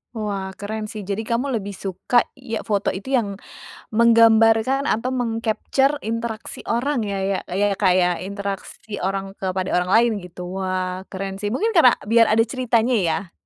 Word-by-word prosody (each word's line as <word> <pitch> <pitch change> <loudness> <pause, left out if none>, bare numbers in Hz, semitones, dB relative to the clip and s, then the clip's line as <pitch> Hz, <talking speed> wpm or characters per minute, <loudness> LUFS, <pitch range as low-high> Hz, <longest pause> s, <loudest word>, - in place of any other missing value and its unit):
Wah, 200 -3 -3
keren 215 +1 -5
sih. 210 -2 -7
Jadi 200 +2 -2
kamu 235 +5 -1
lebih 205 -3 -2
suka 200 +5 0
ya 235 -4 -6
foto 205 -2 0
itu 200 +9 -5
yang 205 -6 0 0.5
menggambarkan 230 +3 +4
atau 235 +4 0
meng-capture 245 +4 0
interaksi 225 -1 -5
orang 245 +1 0
ya, 200 -2 -3
ya, 195 -1 0
ya 200 +2 +1
Kak, 190 -1 +3
ya? 180 0 +3
Interaksi 200 +2 -6
orang 195 +1 -2
kepada 185 -1 -2
orang 180 +1 0
lain 235 +3 +5
gitu. 180 +2 -6
Wah, 185 0 -2
keren 195 0 -4
sih, 205 +1 -3
mungkin 435 - 0
karena 310 -8 +7 0.2
biar 230 0 +5
ada 220 - +3
ceritanya 245 0 +1
ya? 170 +2 -2
215 Hz, 160 wpm, -22 LUFS, 195-235 Hz, 0.5 s, karena